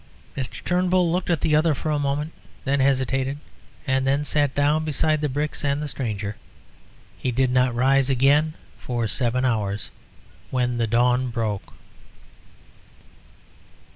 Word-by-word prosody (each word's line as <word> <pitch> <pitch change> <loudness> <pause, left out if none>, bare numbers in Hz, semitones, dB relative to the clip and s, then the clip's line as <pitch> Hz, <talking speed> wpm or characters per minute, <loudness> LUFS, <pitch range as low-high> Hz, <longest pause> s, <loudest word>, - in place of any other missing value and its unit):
Mr. 130 -2 -5
Turnbull 180 -1 +2
looked 180 +1 -1
at 170 -4 +1
the 155 -2 +2
other 155 0 +3
for 155 +4 -3
a 150 - +1
moment, 145 +2 -1 0.3
then 140 +1 +1
hesitated, 135 0 +1 0.5
and 130 -1 +1
then 140 +2 +1
sat 145 -1 +1
down 145 +2 +2
beside 155 0 +1
the 150 - 0
bricks 145 +3 -2
and 140 0 +1
the 150 - -3
stranger. 110 -7 -4 0.8
He - - -1
did 130 +1 +1
not 125 -1 +2
rise 135 +2 +3
again 145 +4 +3 0.2
for 120 -2 -2
seven 125 +3 0
hours, 105 -4 -1 0.6
when 125 -2 0
the 115 -1 +1
dawn 125 +3 +2
broke. 110 -4 -3
135 Hz, 140 wpm, -24 LUFS, 125-150 Hz, 0.8 s, other